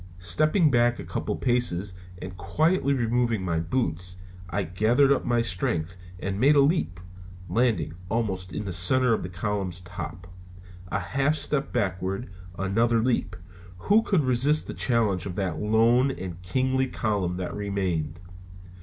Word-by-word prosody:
Stepping 155 - +3
back 120 0 +3
a - - -7
couple - - -3
of - - -11
paces 105 -7 +1 0.3
and 90 0 -7
quietly 155 - +1
removing 120 -5 +1
my 85 -2 0
boots, 90 -1 -2 0.3
I 100 +3 -1
gathered 110 - +3
up 140 - +2
my 120 -1 +2
strength 90 -3 -1 0.2
and 95 +1 -3
made 140 +5 +5
a - - +6
leap, 140 - +2 0.5
landing 115 -10 +1 0.2
almost 95 -5 -2
in 105 - -4
the 95 - -3
center 120 +8 +4
of - - 0
the 90 - -5
column's 95 -1 -3
top. 90 -1 -8 0.6
A 95 - -1
half 135 +11 0
step 145 -1 -1
backward, 95 +4 -2 0.3
another 115 +5 +2
leap 120 +1 0 0.4
who 205 - +3
could 190 -8 +1
resist 135 +4 +2
the - - -6
challenge 105 -7 +1
of 90 - -5
that 90 -5 -2
lone 115 - +3
and 90 -8 -6
kingly 130 +8 0
column 100 -7 -1
that 90 - -4
remained? 95 -6 -2
105 Hz, 155 wpm, -26 LUFS, 90-130 Hz, 0.6 s, a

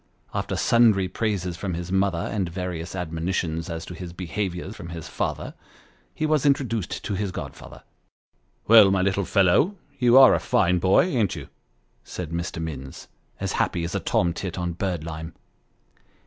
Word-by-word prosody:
After - - -2
sundry 110 -5 +4
praises 95 -5 -2
from 90 -1 -3
his 85 +1 -5
mother, 95 -2 +2
and 95 +1 -2
various 90 -1 -5
admonitions 85 0 -2
as 85 0 -5
to - - -8
his 85 0 -8
behaviour 90 +1 -4
from 105 -6 -9
his 85 -2 -7
father, - - -3 0.6
he 155 - -1
was 155 -2 +2
introduced 130 - 0
to - - -3
his 100 0 -2
godfather. - - -9 0.4
" - - -42
Well, 110 -3 +8
my 95 -1 +2
little 100 0 +1
fellow 100 - +3 0.2
you 125 -1 +5
are 135 -1 +9
a - - +2
fine 90 +1 +2
boy, 95 +2 +4
ain't 120 - 0
you? - - -8 0.3
" - - -42
said 85 -3 -5
Mr. 85 0 -3
Minns, 70 -5 -7 0.3
as - - -2
happy 85 - -1
as 85 - -4
a - - 0
tomtit 85 +1 -1
on 90 -1 -2
birdlime. 80 -3 -4
90 Hz, 165 wpm, -24 LUFS, 85-100 Hz, 0.6 s, are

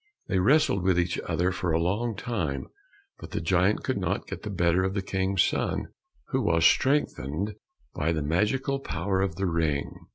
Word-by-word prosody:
They 95 - +2
wrestled 130 +1 +3
with 90 -1 +2
each 85 0 0
other 90 +2 +1
for 90 -1 -2
a 80 - +2
long 105 +7 0
time, 85 - -3 0.5
but - - -9
the - - -3
giant 90 +4 +2
could - - -1
not - - -1
get - - -7
the 105 - -5
better 90 -1 +2
of 95 +1 -1
the 100 - -1
King's 95 0 +1
son, - - -1 0.4
who - - 0
was 85 -1 +2
strengthened 105 - +2 0.4
by 80 +3 0
the 80 -3 -1
magical 105 - 0
power 95 -5 -1
of 95 -4 -1
the 95 +2 -1
ring. 80 -5 0
95 Hz, 185 wpm, -27 LUFS, 85-100 Hz, 0.5 s, wrestled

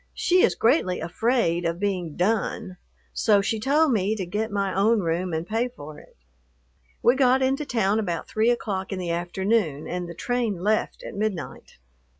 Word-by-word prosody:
She 365 0 +3
is - - +3
greatly 225 - +2
afraid 175 0 0
of 170 0 -2
being 185 -6 -2
"done," 195 0 -1 0.4
so 210 -3 +3
she 215 +2 -1
told 290 +6 +3
me 210 -1 +1
to 195 -4 -4
get 210 +5 -3
my 200 -2 -1
own 210 +3 +3
room 175 +1 -1
and 160 +1 -2
pay 225 +5 0
for 155 -12 -11
it. - - -20 0.9
We 245 - +5
got 260 0 +3
into 270 +3 0
town 215 -2 +1
about 175 -6 -3
three 220 +2 +1
o'clock 200 -5 -2
in 195 - -3
the 175 -2 -3
afternoon, 175 -2 -1
and 175 -1 -4
the 170 - -8
train 240 0 -1
left 215 +1 0
at - - -7
midnight. 200 -5 -4
205 Hz, 175 wpm, -25 LUFS, 175-230 Hz, 0.9 s, We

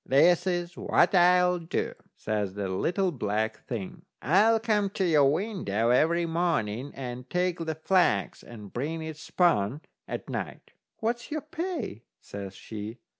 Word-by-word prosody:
"This 175 +7 +4
is 175 -1 -1
what - - +2
I'll 180 0 +5
do," 165 -1 -2 0.2
says 105 -3 -2
the 100 -1 -2
little 180 - 0
black 110 -5 -2
thing: 110 -6 -5 0.2
"I'll 210 - +4
come 210 -3 +1
to 195 -1 -1
your 150 -5 +5
window 150 - -1
every 170 +7 +3
morning 145 -7 -1
and 125 -1 -6
take 180 0 0
the 160 -1 -3
flax 160 - +1
and 105 -4 -11
bring 160 +6 -3
it 160 -1 -6
spun 150 - +1 0.3
at - - -5
night." - - -5 0.3
"What's 235 +2 -2
your 305 0 -2
pay?" 310 - -4 0.2
says 100 -1 -8
she. 110 +3 -7
160 Hz, 145 wpm, -28 LUFS, 115-180 Hz, 0.3 s, I'll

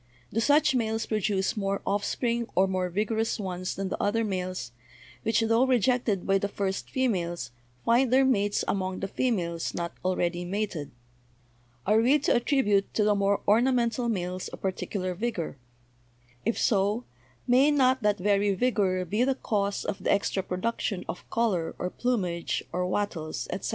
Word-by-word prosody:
Do 225 - +1
such 290 +5 +4
males 225 -2 0
produce 205 -3 0
more 195 -2 -1
offspring 235 +4 0
or 190 - +5
more 185 -1 -1
vigorous 220 +5 -1
ones 185 -2 -3
than 195 -1 -3
the - - -3
other 225 +3 +1
males, 185 - -3 0.5
which, 225 0 +1
tho 225 +2 +3
rejected 245 -5 +2
by 195 0 +3
the 200 - -1
first 195 -1 -3
females, 175 - -1 0.3
find 240 +2 +3
their 265 +1 +5
mates 205 -5 +1
among 185 -1 -2
the 195 - -1
females 180 -8 -1
not 170 0 -3
already 175 -1 0
mated? 185 -5 -3 1.0
Are 215 +2 +4
we 260 +6 +5
to 290 - +1
at 240 - 0
tribute 210 -9 +2
to 215 - +3
the 210 0 +4
more 200 0 +1
ornamental 235 +1 +2
males 185 -3 -3
a - - -7
particular 185 0 -3
vigor? 180 - -3 0.9
If 230 - 0
so, 205 +2 +2 0.4
may 255 +4 +5
not 260 -3 +3
that 210 -1 +2
very 200 +1 +2
vigor 195 -6 +1
be 210 +7 +1
the 265 +1 +2
cause 200 -5 -1
of - - -4
the - - +2
extra 200 -1 +1
production 190 +1 -2
of - - -7
color 190 -8 0
or 180 - -3
plumage 185 -9 -1
or 180 +1 -1
wattles, 180 -5 -2
etc.? - - -3
205 Hz, 160 wpm, -27 LUFS, 185-235 Hz, 1.0 s, or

